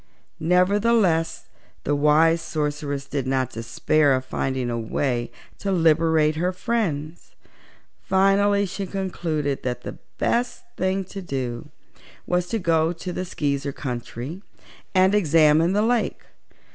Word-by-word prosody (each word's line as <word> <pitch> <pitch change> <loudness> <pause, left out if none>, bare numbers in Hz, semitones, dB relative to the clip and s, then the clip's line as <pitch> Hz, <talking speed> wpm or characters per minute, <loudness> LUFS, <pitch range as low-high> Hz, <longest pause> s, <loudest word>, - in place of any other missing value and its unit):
Nevertheless, 180 -1 +2 0.4
the 145 - +1
wise 155 +3 +4
Sorceress 150 -3 -3
did 140 -2 -3
not 130 -1 0
despair 135 +5 +1
of 130 0 -3
finding 130 -2 -2
a 115 - -2
way 120 +1 -2 0.3
to 200 - -2
liberate 160 -2 +3
her 180 +3 +1
friends. 175 -7 -3 0.7
Finally 200 +1 +3
she 195 +1 -5
concluded 165 -7 -2
that 125 -1 -3
the - - -7 0.2
best 240 0 0
thing 190 +1 0
to 195 +1 -8
do 130 -5 -4 0.6
was 180 0 0
to 225 - -1
go 165 -4 +2
to 180 +1 -6
the 185 - -3
Skeezer 140 -4 -2
country 125 +5 -6 0.5
and 190 +1 +5
examine 165 -2 +4
the 210 +1 +2
lake. 235 0 0
160 Hz, 125 wpm, -23 LUFS, 140-190 Hz, 0.7 s, and